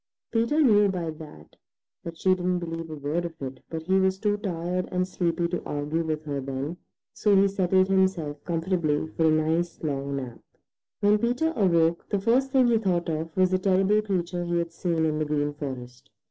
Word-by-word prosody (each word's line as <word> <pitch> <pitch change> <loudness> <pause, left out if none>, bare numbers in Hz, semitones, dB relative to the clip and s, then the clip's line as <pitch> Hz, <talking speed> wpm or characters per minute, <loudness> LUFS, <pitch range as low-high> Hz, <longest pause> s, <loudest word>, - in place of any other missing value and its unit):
Peter 235 +7 +1
knew 210 -5 +5
by 175 -4 -2
that 150 - -13 0.5
that 165 -1 -7
she 185 +2 +3
didn't 180 0 0
believe 165 -1 -5
a 155 - -5
word 150 +4 -2
of 165 -1 -7
it, 130 -1 -6
but 160 -1 -5
he 190 +3 +2
was 190 0 +2
too 205 0 +1
tired 180 -2 -3
and 180 0 0
sleepy 170 -2 -1
to 175 - -3
argue 150 +3 -2
with 155 -1 -3
her 140 -2 -3
then, 135 +5 -4 0.4
so 210 -2 +2
he 195 +1 +5
settled 190 -1 +2
himself 190 -6 0
comfortably 165 -3 0
for 160 - +2
a - - +5
nice 160 +2 +1
long 140 -2 -2
nap. 125 -4 -6 0.6
When 205 +1 +4
Peter 250 +8 0
awoke, 170 -5 +2
the 200 - 0
first 240 +6 +2
thing 265 -1 +4
he 230 -2 +3
thought 180 -5 0
of 160 +2 -4
was 185 0 +4
the 185 - +2
terrible 195 +2 +3
creature 180 -4 -2
he 175 0 -1
had 170 -1 -1
seen 165 -1 -1
in 155 -1 0
the 155 - 0
Green 145 -1 -1
Forest. 130 -4 -7
170 Hz, 200 wpm, -26 LUFS, 155-190 Hz, 0.6 s, knew